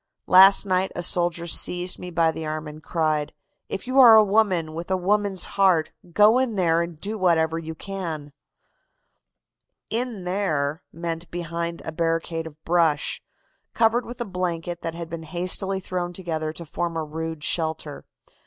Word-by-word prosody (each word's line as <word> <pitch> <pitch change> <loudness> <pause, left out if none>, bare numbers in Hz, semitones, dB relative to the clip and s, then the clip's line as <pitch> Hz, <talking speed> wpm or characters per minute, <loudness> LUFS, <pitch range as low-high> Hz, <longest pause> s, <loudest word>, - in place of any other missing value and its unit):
"Last 195 +2 +7
night 185 0 0
a 175 - -2
soldier 175 -1 0
seized 180 +1 +1
me 180 - -7
by 165 -2 +2
the 160 - -6
arm 155 0 -4
and 150 +1 -10
cried: 155 -2 -1 0.4
'If - - -4
you 255 +2 +2
are 235 -4 +10
a 220 - +8
woman 195 -6 +1
with 170 +3 -6
a 190 - +1
woman's 200 0 0
heart, 185 -5 +2 0.2
go 210 +7 +5
in 255 -4 0
there 170 -3 +2
and 170 -2 -5
do 210 +4 -4
whatever 165 -3 +2
you 160 0 -7
can.' 160 -6 -6 1.6
"'In 230 -3 -2
there' 160 -5 -1
meant 165 0 -5
behind 170 0 -4
a - - -4
barricade 165 0 -2
of 150 -1 -12
brush, 165 -4 +1 0.5
covered 230 +1 +2
with 240 +1 -8
a 240 - -2
blanket 175 -3 -3
that 165 0 -4
had 170 -1 -6
been 165 0 -6
hastily 185 +4 -2
thrown 180 -1 -4
together 160 -4 -3
to 170 +2 -8
form 170 +2 -3
a 160 - -1
rude 160 0 -5
shelter. 160 -3 -1
170 Hz, 165 wpm, -24 LUFS, 160-190 Hz, 1.6 s, are